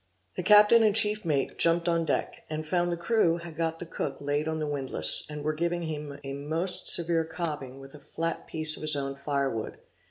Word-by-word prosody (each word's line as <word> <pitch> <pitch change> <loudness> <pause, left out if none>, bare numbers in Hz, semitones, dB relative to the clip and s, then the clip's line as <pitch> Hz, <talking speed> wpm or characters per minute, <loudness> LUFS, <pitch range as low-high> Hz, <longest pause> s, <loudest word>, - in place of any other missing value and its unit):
The - - -3
captain 210 +4 +6
and 215 -2 +2
chief 210 -1 +4
mate 140 -4 -2
jumped 170 +1 +3
on 170 -1 0
deck, - - -3
and 155 0 -5
found 175 +2 -1
the 170 - -3
crew 170 -2 +1
had 170 -2 -10
got 165 0 -2
the 175 - -8
cook 165 - -5
laid 145 +2 -2
on 160 0 -3
the 155 - -3
windlass, 140 -3 +1
and 150 -1 -7
were 155 +1 -1
giving 170 +2 -3
him 150 -3 -6
a 135 0 -6
most 160 +6 -2
severe 170 -1 +7
cobbing 150 -5 -6
with 135 0 -13
a 150 - -13
flat 165 +3 -5
piece 155 -1 0
of - - -10
his 155 -1 +2
own 135 -1 -4
fire 140 -1 -2
wood. 110 - -6
160 Hz, 220 wpm, -27 LUFS, 145-170 Hz, -, severe